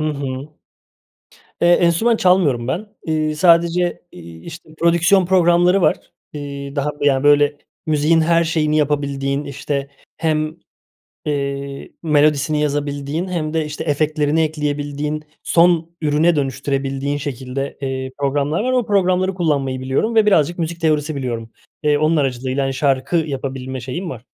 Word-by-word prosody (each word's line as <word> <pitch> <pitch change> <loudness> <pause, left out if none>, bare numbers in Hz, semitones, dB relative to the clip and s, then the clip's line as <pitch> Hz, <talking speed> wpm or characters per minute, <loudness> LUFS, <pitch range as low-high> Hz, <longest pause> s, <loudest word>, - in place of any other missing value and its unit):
Hı - - -1
hı. 140 -2 -3 1.3
Eee, 175 - +4
enstrüman 175 +7 +3
çalmıyorum 160 - +2
ben. 185 +10 -2 0.2
Iıı, 155 -1 0
sadece, 170 0 +3
iii, 85 -1 -12
işte 160 -1 -11
prodüksiyon 175 +3 +3
programları 180 +1 +4
var. - - +4 0.4
İii, 140 -1 -7
daha 145 +1 0
ya, 135 -2 +2
böyle 145 0 +4 0.3
müziğin 155 +1 +3
her 170 +1 +3
şeyini 155 -2 +1
yapabildiğin, 140 -1 -1
işte, 140 0 -4 0.3
hem, 155 0 -1 0.7
eee, 140 -1 -3
melodisini 150 -1 +2
yazabildiğin 145 +3 -2
hem 160 -4 -3
de, 160 -1 0
işte, 150 +1 -5
efektlerini 150 0 +1
ekleyebildiğin, 150 0 -2 0.2
son 170 -1 +3
ürüne 155 +3 +2
dönüştürebildiğin 135 0 -2
şekilde, 135 -1 -5
eee, 130 -1 -3
programlar 145 +6 0
var. 255 - 0
O 250 -2 +1
programları 190 -2 +1
kullanmayı 140 -7 -1
biliyorum 135 - -1
ve 220 -1 +5
birazcık 175 -3 +2
müzik 165 +1 -3
teorisi 155 -1 +1
biliyorum. 120 -4 -4 0.3
Eee, 150 -1 +3
onun 155 +2 +2
aracılığıyla 130 -1 -1
hani 135 - -1
şarkı 135 +3 0
yapabilme 135 -4 -3
şeyim 170 +9 -5
var. 125 0 -8
150 Hz, 135 wpm, -19 LUFS, 140-165 Hz, 1.3 s, ve